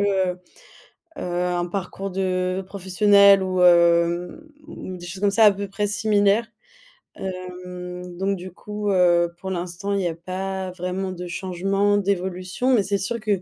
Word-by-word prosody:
heu 190 -3 +1 0.8
heu, - - -5
un 175 0 -1
parcours 195 +1 -5
de 185 0 -1
professionnel 200 +1 +5
ou 185 -1 -1
hem, 170 0 +4 0.3
ou 185 -11 -7
des 175 0 -10
choses 185 +2 -7
comme 205 -1 +3
ça 220 +2 +5
à 210 - +8
peu 200 +1 -5
près 205 +2 -2
similaires. 205 +1 +2 0.7
Hem, 180 -1 -7
donc 195 +1 0
du 185 +1 -8
coup, 210 +3 -5
heu, 175 -2 +3
pour 190 - -6
l'instant 180 +3 -3
il 200 - 0
y 180 - 0
a 165 - -3
pas 185 +2 -4
vraiment 185 +1 -4
de 180 0 -6
changement, 195 +3 0
d'évolution, 190 +4 -1
mais 210 -5 +4
c'est 200 0 0
sûr 230 +5 -3
que, 205 -4 0
185 Hz, 160 wpm, -23 LUFS, 180-200 Hz, 0.8 s, à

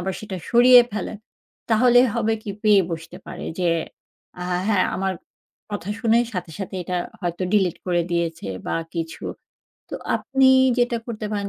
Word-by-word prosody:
আবার 190 +1 -3
সেটা 205 -3 -6
সরিয়ে 245 +1 +8
ফেলেন 210 0 -4 0.5
তাহলে 245 +2 +5
হবে 225 -1 +1
কি? 210 - -5
পেয়ে 205 -3 +5
বসতে 165 +2 -6
পারে। 180 - -7
যে, 175 -2 +1 0.7
"আহা 180 0 -1
হ্যাঁ, 200 -4 +3
আমার 190 0 -1 0.6
কথা 205 -2 -5
শুনেই 235 0 +3
সাথে, 180 -3 -5
সাথে 195 -1 -6
এটা 180 +1 -3 0.2
হয়তো 175 0 -3
delete 190 -5 +2
করে 175 -1 +1
দিয়েছে" 165 -10 -2 0.2
বা - - -1 0.2
কিছু। 165 -1 -5 0.7
তো - - -5 0.2
আপনি 270 -1 +2 0.3
যেটা 245 -1 +2
করতে 215 -2 -5
পারেন 200 -1 -2
200 Hz, 155 wpm, -22 LUFS, 180-225 Hz, 0.7 s, সরিয়ে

